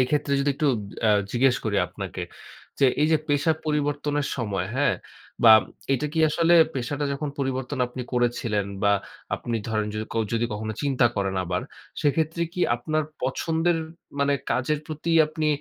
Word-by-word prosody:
এইক্ষেত্রে 140 +3 +1
যদি 145 - +2
একটু 150 - 0 0.4
আ - - +6 0.2
জিজ্ঞেস 125 +1 +3
করি 105 -2 0
আপনাকে। - - -6 0.6
যে 135 - +7 0.2
এইযে 160 +1 +4
পেশা 145 +3 +2
পরিবর্তনের 145 -1 0
সময়, 100 -7 -2
হ্যাঁ? 145 - +3 0.5
বা 110 - +10 0.4
এটা 145 +4 -1
কি 160 - -2
আসলে 170 +2 +3 0.2
পেশাটা 140 +3 -2
যখন 145 +1 -3
পরিবর্তন 130 0 -2
আপনি 125 +1 -6
করেছিলেন 120 -4 0 0.2
বা 100 0 +4 0.4
আপনি 115 -1 -3
ধরেন 110 -1 0
যদি 110 - -2
ক - - -9 0.2
যদি 115 0 +1
কখনো 110 +1 -3
চিন্তা 135 -4 +3
করেন 95 -1 0
আবার, 90 +1 -2 0.4
সেক্ষেত্রে 160 +3 +1
কি 180 - -4 0.2
আপনার 155 +6 -1 0.2
পছন্দের 165 +5 +1 0.4
মানে 140 0 +3 0.2
কাজের 145 +4 +1
প্রতি 155 +1 -4 0.2
আপনি 155 0 -2
140 Hz, 155 wpm, -25 LUFS, 120-150 Hz, 0.6 s, বা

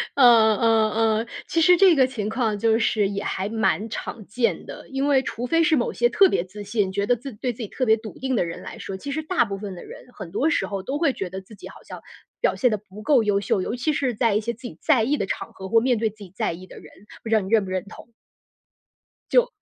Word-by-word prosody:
嗯 225 -3 +5
嗯。 225 +1 +1 0.2
其 330 - +1
实 360 +2 +6
这 370 -3 +6
个 260 -2 +5
情 220 -5 -4
况 220 -2 -1
就 225 0 +3
是 215 -2 +1
也 200 0 -4
还 195 +2 -3
蛮 220 0 0
常 220 -1 -6
见 235 +3 -1
的。 - - -10
因 270 +1 -1
为 275 -2 +4
除 240 0 -4
非 330 +4 +3
是 315 - +3
某 245 - 0
些 240 0 +2
特 390 +6 +5
别 170 - 0
自 205 +3 -10
信， 205 -2 -1
觉 200 +1 -1
得 245 - +3
自 265 +3 -8
对 245 +4 -3
自 - - -21
己 210 - -5
特 255 - -2
别 220 -1 +4
笃 220 -1 -10
定 265 -1 -1
的 180 - +1
人 165 - -7
来 - - -9
说， 195 - -6
其 280 +8 -6
实 315 +3 -2
大 345 -5 +1
部 195 -2 -5
分 195 -1 -7
的 175 - -10
人， - - -11
很 185 -5 -9
多 285 +10 +1
时 - - 0
候 195 -2 -4
都 275 +2 -3
会 290 -6 +2
觉 190 -6 -5
得 190 +2 -7
自 205 +3 -15
己 - - -11
好 - - -14
像 - - -10 0.4
表 - - +2
现 250 - +2
得 215 - 0
不 210 +1 -13
够 250 -1 +3
优 205 -1 +2
秀， 195 -1 0
尤 225 - -3
其 295 +5 -1
是 265 -3 0
在 225 -1 +1
一 210 - +2
些 235 +2 -3
自 230 - -19
己 - - -12
在 270 -8 +3
意 285 +6 +1
的 - - -1
场 - - -5
合、 190 0 -8
或 225 - +5
面 245 +1 +1
对 220 0 0
自 215 - -19
己 200 -4 -12
在 - - -1
意 185 +3 -11
的 - - -13
人， - - -15 0.3
不 225 - -6
知 225 - +3
道 215 - +3
你 190 - -6
认 215 -3 +3
不 185 - -7
认 185 -1 -2
同？ 220 +3 -13 1.2
就 - - +4
225 Hz, 300 characters per minute, -23 LUFS, 205-255 Hz, 1.2 s, 实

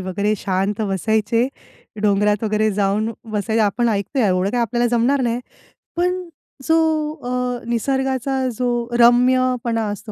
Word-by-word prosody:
वगैरे 200 +3 -1
शांत 195 +3 -1
बसायचे. 220 +4 +1 0.6
डोंगरात 210 +1 +2
वगैरे 215 0 +1
जाऊन 205 +2 0 0.2
बसायचं. 220 +1 0
आपण 225 +4 +1
ऐकतोय 220 +5 -1
एवढं 185 0 +1
काही 245 +1 0
आपल्याला 240 +1 +1
जमणार 265 +4 +2
नाही. 235 0 -1 0.6
पण 360 +1 0 0.4
जो 325 +3 +3 0.5
अ, 250 -1 -2
निसर्गाचा 265 +2 -1 0.2
जो 240 -1 -1
रम्यपणा 245 -1 +3
असतो 205 +1 -6
230 Hz, 125 wpm, -20 LUFS, 210-250 Hz, 0.6 s, जो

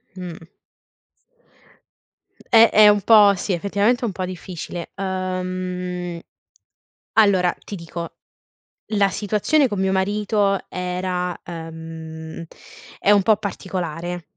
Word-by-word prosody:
Mh. 175 -3 -8 2.0
Eh, 225 0 +7
è 215 0 +7
un 205 0 +3
po' 205 -1 +7
sì, 190 +1 -2
effettivamente 200 +6 +1
è - - 0
un 225 - -1
po' 185 0 -4
difficile. 180 -1 -7
Uhm 185 -2 -3 1.0
allora, 190 -4 +4
ti - - -9
dico, 170 -2 -6 0.8
la 200 -1 +3
situazione 215 +10 +1
con 205 -4 -4
mio 190 0 +1
marito 200 +1 +1
era 180 0 -3
ehm, 160 -1 -8 0.5
è 205 - +3
un 205 -1 +6
po' 215 +2 +5
particolare. 180 -4 -5
185 Hz, 110 wpm, -22 LUFS, 175-205 Hz, 2.0 s, Eh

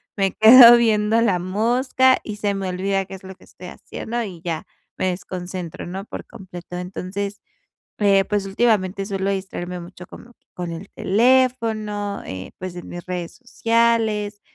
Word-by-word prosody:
me 195 -2 +1
quedo 235 +2 +9
viendo 220 -1 +2
la 200 -6 +2
mosca 245 +7 +2
y 210 -1 -6
se 205 -1 -1
me 195 -1 -3
olvida 195 +2 -1
qué 195 - -9
es 190 - -13
lo 190 0 -10
que - - -22
estoy 180 - -13
haciendo, 235 +5 -5
y 180 -5 -8
ya 165 -3 -4 0.3
me 185 - 0
desconcentro, 180 -1 -6
¿no?, 190 +3 -6
por - - -8
completo, 180 -2 -10
entonces, 195 +2 -5 0.6
eh, 195 -2 +4
pues, 205 -1 -2
últimamente, 195 -2 +1
suelo 195 -1 -2
distraerme 180 -2 -4
mucho 180 +1 -11
como 240 - -14
que - - -49
con 175 -1 -5
el 165 +4 -8
teléfono, 220 -3 +1
eh, 95 0 -7
pues, 185 -1 -6
en 175 - -8
mis 175 -1 -8
redes 180 -2 -5
sociales, 230 -4 0
195 Hz, 165 wpm, -21 LUFS, 180-220 Hz, 0.6 s, quedo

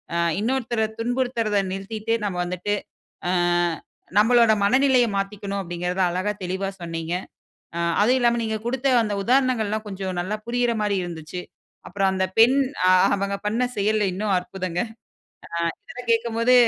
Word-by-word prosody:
அ - - +1 0.2
இன்னொருத்தர 235 -1 0
துன்புறுத்துறுத 240 -3 0 0.2
நிறுத்திட்டு 215 +3 -3
நம்ம 190 -3 -2
வந்துட்டு 180 +3 -2 0.5
அ - - +2 0.9
நம்மளோட 230 +1 +5
மனநிலைய 255 +2 +4
மாத்திக்கணும் 200 0 -3
அப்படிங்கறத 180 +1 -3
அழகா 185 +4 -1
தெளிவா 190 +2 -2
சொன்னீங்க! 165 0 -4 0.6
அ - - -1 0.2
அதுவும் 245 +5 +4
இல்லாம 235 -1 +3
நீங்க 220 -1 -1
கொடுத்த 260 +3 -1 0.2
அந்த 210 -2 -2
உதாரணங்கள் 255 -2 +2
எல்லாம் 215 +1 -2
கொஞ்சம் 190 -2 -4
நல்லா 190 +4 -2
புரியற 240 0 +1
மாதிரி 205 -1 +1
இருந்துச்சு. 170 0 -6 0.5
அப்புறம் 195 -1 +1
அந்த 190 0 +1
பெண் 240 +4 +7 0.6
அவங்க 200 0 -2
பண்ண 225 +4 +1
செயல்லா 210 +1 +2
இன்னும் 205 +2 -1
அற்புதங்க. 180 -1 -4
அ - - -13 0.9
இதெல்லாம் 245 -1 -8
கேட்கும்போது 230 +1 +2
210 Hz, 135 wpm, -23 LUFS, 190-235 Hz, 0.9 s, பெண்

